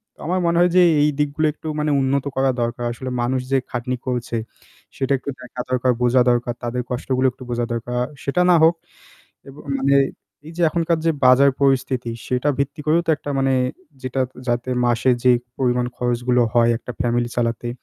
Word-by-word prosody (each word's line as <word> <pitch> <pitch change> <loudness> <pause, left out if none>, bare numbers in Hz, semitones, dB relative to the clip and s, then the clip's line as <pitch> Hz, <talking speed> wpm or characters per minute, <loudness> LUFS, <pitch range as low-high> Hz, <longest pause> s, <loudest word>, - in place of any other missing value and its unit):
তো - - -31
আমার 180 +3 0
মনে 170 0 +2
হয় 175 +1 +5
যে - - +7 0.2
এই 150 - +4
দিকগুলো 150 +2 +1
একটু 160 - -10
মানে 150 0 0
উন্নত 135 +1 0
করা 135 0 +2
দরকার 120 +1 -2
আসলে 130 +2 -6
মানুষ 130 +2 0
যে 135 - +4
খাটনি 120 +1 -2
করছে, 120 -2 -2 0.6
সেটা 135 0 -2
একটু 130 - -7
দেখা 125 0 -7
দরকার 130 0 +2
বোঝা 125 +1 +4
দরকার 120 0 0
তাদের 120 +1 -2
কষ্টগুলো 130 +1 -1
একটু 130 +1 -13
বোঝা 120 0 -1
দরকার 120 +1 -3 0.2
সেটা 140 +6 0
না 180 - +6
হোক। 165 +2 +5 0.7
এবং 140 +2 -12 0.2
মানে 140 +1 +3 0.5
এই 165 - -9
যে 175 - -1
এখনকার 170 0 0
যে 165 - +5
বাজার 130 +2 +6
পরিস্থিতি 130 -3 +1 0.2
সেটা 125 +3 0
ভিত্তি 140 +2 -2
করেও 165 +3 +3
তো 165 - +2
একটা 145 - -7
মানে 135 0 +2 0.5
যেটা 130 +1 -2 0.3
যাতে 120 +1 -1 0.2
মাসে 120 +2 +2
যেই 125 -1 +5 0.2
পরিমাণ 125 -1 +1
খরচগুলো 125 0 +1
হয় 120 -1 +4
একটা 125 - -8
ফ্যামিলি 120 -1 0
চালাতে 120 0 -1
130 Hz, 185 wpm, -21 LUFS, 120-140 Hz, 0.7 s, যে